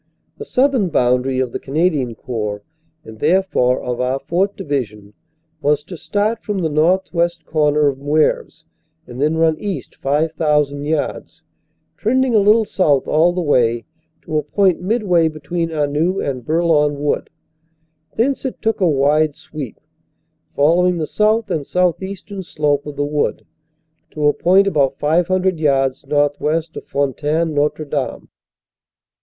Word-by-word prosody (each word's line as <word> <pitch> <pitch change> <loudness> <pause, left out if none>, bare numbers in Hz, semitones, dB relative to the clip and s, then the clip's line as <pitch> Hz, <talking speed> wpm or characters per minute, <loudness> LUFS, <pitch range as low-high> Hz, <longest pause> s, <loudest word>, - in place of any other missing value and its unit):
The 440 - -6
southern 255 - +2
boundary 125 -1 +1
of 130 -2 -1
the - - -4
Cana 155 +6 +1
dian 130 -9 -2
Corps, 105 -5 -4 0.4
and 110 -1 -12
therefore 155 -6 +2
of 125 -1 -3
our 130 +1 0
4th. 190 +7 -1
Division, 110 - -4 0.5
was 145 0 +1
to 180 +4 -9
start 205 +7 -1
from 210 -2 -3
the 170 -4 0
northwest 170 +1 +1
corner 150 -1 +2
of 135 -1 -1
Mceuvres, 150 +2 0 0.4
and 125 +2 -8
then 155 +2 +1
run 160 -1 +2
east 195 -10 -5
5,000 150 -1 0
yards, 155 -1 -3 0.5
trending 255 +3 +1
a 215 - +5
little 215 +2 +4
south 150 -10 +1
all 160 +3 +3
the 180 0 -2
way, 120 -6 +2 0.4
to 155 - -1
a - - -1
point 185 +5 +1
mid 215 +5 0
way 175 -4 +3
between 160 +2 -3
Anneux 155 +4 0
and 130 -3 -3
Bourlon 155 -1 +2
Wood. 145 0 -1 0.9
Thence 260 +5 0
it 265 - -4
took 225 -1 -1
a 180 - +4
wide 150 +1 +2
sweep, 145 -7 -8 0.8
following 175 +5 +3
the 160 - -1
south 215 +6 +1
and 150 - -1
southeastern 190 +4 -2
slope 150 -4 -1
of 145 - -6
the 145 0 -1
wood, 145 0 -1 0.7
to 150 -1 -2
a 145 - +5
point 190 +3 +4
about 140 -8 +1
500 180 +3 +1
yards 135 -3 +1
northwest 150 +2 0
of - - -8
Fontaine 150 +4 -1
Notre 150 +1 0
Dame. 145 -2 -4
155 Hz, 150 wpm, -18 LUFS, 145-180 Hz, 0.9 s, a